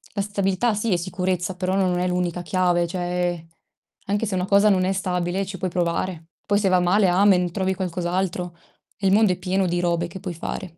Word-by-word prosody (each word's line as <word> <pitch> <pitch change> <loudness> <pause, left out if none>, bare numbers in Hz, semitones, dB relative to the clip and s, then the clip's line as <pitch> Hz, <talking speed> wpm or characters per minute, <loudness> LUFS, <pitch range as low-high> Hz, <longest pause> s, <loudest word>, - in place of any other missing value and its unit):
la 200 - 0
stabilità 200 +2 0
sì, 210 -1 0
è - - +2
sicurezza, 180 0 -2
però 185 0 -1
non 180 -2 +1
è 180 - 0
l'unica 180 -1 -1
chiave. 175 -1 +1
Cioè, 175 -1 -2 0.6
anche 205 +3 0
se 195 -3 -2
una 180 0 0
cosa 200 +1 +5
non 185 -2 +3
è 190 - +1
stabile 185 0 -1
ci 190 0 -7
puoi 185 +1 -2
provare. 170 -1 -2 0.2
Poi 205 - +2
se 195 -2 +2
va 185 -1 +4
male 185 +3 +3
amen, 180 -1 +3
trovi 190 0 -1
qualcos'altro. 180 -1 -2 0.4
Il 195 -1 +2
mondo 210 -2 +5
è - - -7
pieno 190 0 0
di 175 0 0
robe 170 -1 0
che 185 +2 -9
puoi 180 -3 -4
fare. 170 0 -6
185 Hz, 205 wpm, -23 LUFS, 175-195 Hz, 0.6 s, cosa